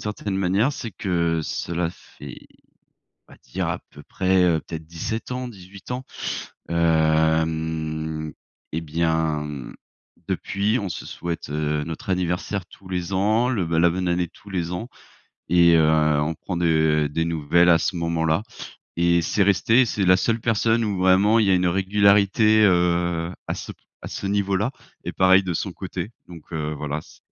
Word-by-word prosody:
certaine 105 Hz, -2 st, -4 dB
manière, 100 Hz, +8 st, +2 dB
c'est 115 Hz, -5 st, -6 dB
que 85 Hz, -3 st, 0 dB
cela 85 Hz, +2 st, -2 dB
fait, 70 Hz, -6 st, -13 dB, 0.8 s
on -, -, -14 dB
va -, -, -17 dB
dire -, -, -3 dB
à -, -, -2 dB
peu 75 Hz, -, -13 dB
près, 95 Hz, +2 st, +1 dB
heu, 85 Hz, -3 st, +3 dB
peut-être 80 Hz, -1 st, -8 dB
17 100 Hz, +9 st, -5 dB
ans, 125 Hz, 0 st, -3 dB
18 95 Hz, -3 st, -13 dB
ans. 125 Hz, +1 st, -3 dB, 0.7 s
Hem, 80 Hz, -1 st, 0 dB, 0.4 s
et 80 Hz, -, -1 dB
bien 80 Hz, -1 st, 0 dB, 0.8 s
depuis, 105 Hz, +5 st, 0 dB
on 100 Hz, -, -3 dB
se 85 Hz, -, -6 dB
souhaite, 85 Hz, -4 st, -5 dB
heu, 75 Hz, 0 st, -1 dB
notre 80 Hz, +3 st, -6 dB
anniversaire 90 Hz, +1 st, -1 dB
tous 95 Hz, -, -16 dB
les 90 Hz, 0 st, -3 dB
ans, 110 Hz, +6 st, +2 dB
le 110 Hz, -8 st, 0 dB
bah, 80 Hz, 0 st, -1 dB
la 85 Hz, +1 st, +5 dB
bonne 90 Hz, +1 st, -2 dB
année 85 Hz, 0 st, +1 dB
tous 100 Hz, +4 st, -16 dB
les 90 Hz, -2 st, -2 dB
ans 110 Hz, +7 st, -4 dB, 0.6 s
et 85 Hz, -1 st, +6 dB
heu, 80 Hz, -1 st, +4 dB, 0.3 s
on 80 Hz, +2 st, -1 dB
prend 90 Hz, -, -6 dB
de 80 Hz, -3 st, +2 dB
des 80 Hz, +2 st, 0 dB
nouvelles 85 Hz, +1 st, +2 dB
à 85 Hz, -, +7 dB
ce 85 Hz, +2 st, -2 dB
moment 85 Hz, -1 st, -1 dB
là 80 Hz, +5 st, +1 dB, 0.5 s
et 85 Hz, 0 st, +3 dB
c'est 100 Hz, +5 st, +1 dB
resté 100 Hz, +5 st, +4 dB
et -, -, +4 dB
c'est 105 Hz, -3 st, -1 dB
la 90 Hz, 0 st, +6 dB
seule 115 Hz, +5 st, 0 dB
personne 115 Hz, 0 st, +1 dB
où 100 Hz, -3 st, -2 dB
vraiment 95 Hz, +4 st, +4 dB
il 110 Hz, -, +4 dB
y -, -, +4 dB
a -, -, +5 dB
une 90 Hz, 0 st, +2 dB
régularité, 100 Hz, +3 st, +4 dB
heu, 85 Hz, -2 st, +2 dB, 0.2 s
à -, -, -1 dB
ce -, -, -7 dB
p -, -, -34 dB, 0.2 s
à -, -, -7 dB
ce -, -, -6 dB
niveau 100 Hz, -1 st, 0 dB
là, 115 Hz, +7 st, -1 dB, 0.3 s
et -, -, -3 dB
pareil 95 Hz, +1 st, +5 dB
de 90 Hz, -2 st, -2 dB
son 95 Hz, +3 st, -3 dB
côté. 95 Hz, +2 st, -6 dB, 0.2 s
Donc, 85 Hz, -3 st, -11 dB
heu, 75 Hz, -2 st, -3 dB
voilà 75 Hz, +1 st, -4 dB
c -, -, -19 dB
90 Hz, 180 wpm, -23 LUFS, 80-100 Hz, 0.8 s, à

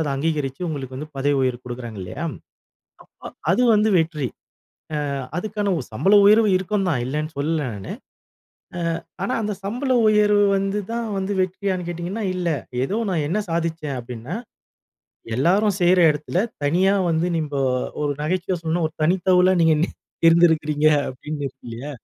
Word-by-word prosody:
அதை 150 Hz, -3 st, -1 dB
அங்கீகரிச்சி 145 Hz, -1 st, -2 dB
உங்களுக்கு 130 Hz, -4 st, -5 dB
வந்து 150 Hz, +3 st, -6 dB
பதவி 145 Hz, +1 st, +1 dB
உயர்வு 125 Hz, -1 st, -1 dB
குடுக்குறாங்க, 120 Hz, -4 st, -7 dB
இல்லையா? 145 Hz, -, -6 dB, 0.8 s
அ -, -, -28 dB, 0.2 s
அ -, -, -4 dB, 0.2 s
அது 250 Hz, -, +2 dB
வந்து 210 Hz, +1 st, +3 dB
வெற்றி. 155 Hz, -5 st, -1 dB, 0.8 s
அ -, -, -3 dB, 0.3 s
அதுக்கான 205 Hz, +1 st, -1 dB
உ -, -, -2 dB
சம்பள 190 Hz, -, +3 dB
உயர்வு 215 Hz, +1 st, +6 dB
இருக்கும்தான், 185 Hz, -, -1 dB
இல்லன்னு 150 Hz, +4 st, -3 dB
சொல்லல 150 Hz, -2 st, -1 dB
நானு. 100 Hz, -2 st, -6 dB, 1.1 s
அ -, -, -30 dB, 0.2 s
ஆனா 255 Hz, -, -1 dB
அந்த 210 Hz, 0 st, -1 dB
சம்பள 250 Hz, +7 st, -2 dB, 0.2 s
உயர்வு 210 Hz, -1 st, +4 dB
வந்து 195 Hz, +1 st, -1 dB
தான் 235 Hz, -1 st, -2 dB
வந்து 195 Hz, +1 st, -2 dB
வெற்றியானு 185 Hz, -1 st, -2 dB
கேட்டீங்கனா, 175 Hz, +6 st, -4 dB
இல்ல. 180 Hz, -1 st, -2 dB, 0.4 s
ஏதோ 200 Hz, -, -2 dB
நான் 160 Hz, -5 st, 0 dB
என்ன 190 Hz, +7 st, 0 dB
சாதிச்சேன் 165 Hz, -4 st, -2 dB
அப்படின்னா, 120 Hz, -, -7 dB, 1.0 s
எல்லாரும் 190 Hz, -, +2 dB
செய்ற 180 Hz, +1 st, +5 dB
இடத்தில 150 Hz, +4 st, -2 dB, 0.2 s
தனியா 180 Hz, +7 st, +3 dB, 0.2 s
வந்து 165 Hz, +1 st, +1 dB
நம்போ 150 Hz, -3 st, -2 dB, 0.4 s
ஒரு 145 Hz, -, 0 dB
நகைச்சுவையா 180 Hz, +3 st, -1 dB
சொல்லணும்னா 165 Hz, 0 st, 0 dB
ஒரு -, -, -22 dB
தனித்தவுங்களா 185 Hz, +2 st, +4 dB
நீங்க 165 Hz, -1 st, +5 dB
நீ 175 Hz, -, +3 dB, 0.4 s
இருந்திருக்கிறீங்க 160 Hz, -3 st, +4 dB, 0.2 s
அப்படின்னு 145 Hz, +4 st, -7 dB
இருக்கு 135 Hz, -, -11 dB
இல்லையா. 120 Hz, +6 st, -6 dB
165 Hz, 150 wpm, -22 LUFS, 145-190 Hz, 1.1 s, உயர்வு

